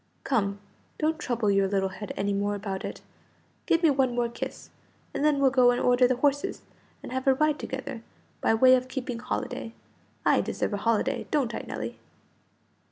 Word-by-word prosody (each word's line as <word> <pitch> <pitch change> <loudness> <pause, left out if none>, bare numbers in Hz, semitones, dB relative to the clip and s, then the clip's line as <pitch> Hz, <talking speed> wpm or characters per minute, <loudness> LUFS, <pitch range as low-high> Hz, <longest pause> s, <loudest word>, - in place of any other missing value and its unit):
Come, 200 -6 0 0.4
don't 315 +1 0
trouble 235 -6 0
your 195 0 +3
little 190 -1 0
head 195 +2 -7
any 200 0 0
more 205 +1 0
about 195 -2 -4
it. - - -6 0.7
Give 335 +1 +3
me 320 - +6
one 260 -3 +1
more 240 -1 +1
kiss, 235 - -7 0.4
and - - -2
then 300 -1 +4
we'll 270 -1 +4
go 255 -2 +5
and 245 0 +2
order 250 0 +4
the 255 - +1
horses, 285 +2 0 0.4
and - - -7
have 260 +1 -3
a 265 - +6
ride 305 +1 +2
together, 265 -2 -5 0.4
by 225 - +3
way 255 +3 +6
of 255 0 +2
keeping 255 -2 -4
holiday. 250 -1 -4 0.5
I - - +4
deserve - - -2
a - - 0
holiday, 230 +4 0
don't 275 -6 0
I, - - -5
Nelly?" - - -5
250 Hz, 185 wpm, -27 LUFS, 215-270 Hz, 0.7 s, me